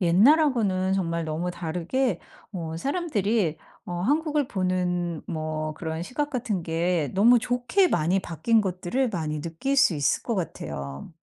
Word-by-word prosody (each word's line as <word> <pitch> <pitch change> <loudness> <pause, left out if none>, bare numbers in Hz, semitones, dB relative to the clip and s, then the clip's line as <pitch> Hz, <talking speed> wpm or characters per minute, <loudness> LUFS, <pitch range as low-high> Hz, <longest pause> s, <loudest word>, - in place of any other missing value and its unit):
옛날하고는 200 - +4
정말 170 -3 -1
너무 160 +3 -2
다르게 175 +9 -1 0.3
어 165 -4 -4
사람들이 220 - 0 0.3
어 - - -5
한국을 295 - +1
보는 180 -3 -1
뭐 155 -2 -3
그런 160 0 -4
시각 290 +10 -2
같은 235 - -2
게 165 -1 0
너무 235 +6 +6
좋게 245 - +2
많이 175 - +2
바뀐 200 +8 +1
것들을 190 +7 -1
많이 155 -5 -3
느낄 170 - -2
수 265 -11 +5
있을 145 -2 +1
것 235 - -2
같아요. 70 - -5
185 Hz, 285 characters per minute, -26 LUFS, 165-245 Hz, 0.3 s, 너무